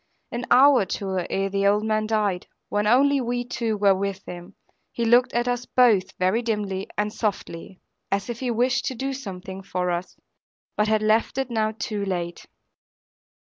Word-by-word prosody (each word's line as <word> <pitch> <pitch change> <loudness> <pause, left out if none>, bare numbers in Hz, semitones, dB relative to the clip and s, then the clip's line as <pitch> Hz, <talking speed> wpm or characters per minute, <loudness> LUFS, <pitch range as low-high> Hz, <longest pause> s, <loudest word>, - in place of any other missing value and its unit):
An 240 +1 -3
hour 270 +2 +7
or - - +1
two 190 0 -2
ere 195 0 0
the 200 0 +1
old 205 +1 +3
man 215 0 0
died, 210 -5 0 0.2
when 205 0 0
only 275 +4 +4
we 245 0 -2
two 230 -3 -2
were 200 -1 +4
with 195 0 -3
him, 175 +2 -9 0.4
he 235 - -2
looked 240 +2 +4
at 240 +1 0
us 245 0 -2
both 210 -7 +3
very 185 +6 +1
dimly 205 -4 -3
and 210 0 -1
softly, 195 -4 -4 0.3
as 200 0 0
if 235 -1 -5
he 255 - -2
wished 245 +2 +1
to 260 - -2
do 270 +3 -3
something 195 -6 -7
for 180 -2 -2
us, 175 +1 -4 0.6
but 210 - +1
had 215 0 +2
left 220 +4 +2
it 265 -2 -2
now 220 -1 +1
too 210 -3 -3
late. 175 -3 -4
215 Hz, 185 wpm, -24 LUFS, 195-240 Hz, 0.6 s, hour